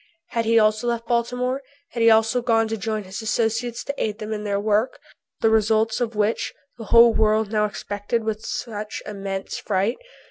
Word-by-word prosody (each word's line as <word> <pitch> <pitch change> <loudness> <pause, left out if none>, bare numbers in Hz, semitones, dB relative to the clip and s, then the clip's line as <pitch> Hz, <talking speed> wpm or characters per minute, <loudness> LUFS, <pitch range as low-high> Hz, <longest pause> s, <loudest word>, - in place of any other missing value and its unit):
Had 230 -1 -1
he 230 +1 +3
also 215 +2 +3
left 235 -1 -1
Baltimore? 250 +2 -1 0.3
Had 235 - -3
he 230 - +6
also 225 +2 +4
gone 225 -2 +2
to 225 - -1
join 215 0 -3
his 190 +4 -7
associates 225 +2 -1
to 280 - -3
aid 210 -1 -2
them 220 -1 -5
in 210 -1 -4
their 200 -1 0
work, 215 +4 0 0.4
the 225 - +4
results 220 +1 +2
of 235 -2 -2
which 210 +1 0 0.2
the 225 - -7
whole 235 +1 +7
world 215 -1 +2
now 210 -1 +2
expected 205 +2 -3
with 220 0 -3
such 210 -2 -5
immense 195 -2 -5
fright? 200 +4 0
220 Hz, 185 wpm, -23 LUFS, 210-230 Hz, 0.4 s, whole